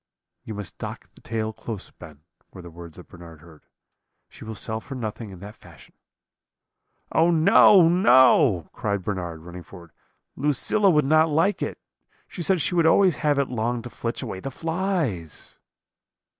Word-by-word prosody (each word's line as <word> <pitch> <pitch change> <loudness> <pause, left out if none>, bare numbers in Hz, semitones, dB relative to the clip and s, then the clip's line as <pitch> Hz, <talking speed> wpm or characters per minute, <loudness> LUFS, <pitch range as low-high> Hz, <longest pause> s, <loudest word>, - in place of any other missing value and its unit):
"'You 110 - -7
must 105 -2 -8
dock - - -8
the - - -20
tail 110 -1 -4
close, 110 -2 -8
Ben,' 80 -4 -14 0.3
were 90 - -12
the 85 - -11
words 85 -1 -12
that 90 - -13
Bernard 85 -3 -14
heard; 80 -2 -18 0.6
'she - - -14
will 110 0 -7
sell 110 +2 -3
for 135 +4 -9
nothing 110 -2 -6
in 95 - -11
that 105 +2 -10
fashion.' - - -18 1.2
"'Oh, 165 +2 +3
no, 175 +2 +6
no!' 130 - +4
cried 100 -3 -3
Bernard, 85 -5 -5
running 85 +2 -10
forward, 85 -2 -14 0.4
'Lucilla 150 +8 +1
would 150 -5 +3
not 155 +3 +3
like 165 +7 +1
it; - - -4 0.5
she 180 - -8
said 185 0 +1
she 145 - -1
would 170 -2 +3
always 185 +1 +4
have 145 -2 0
it 140 -1 0
long 120 0 -2
to 120 - -9
flitch 115 0 -5
away 95 - -6
the 135 - -6
flies.' 160 - -4
115 Hz, 170 wpm, -24 LUFS, -, 1.2 s, no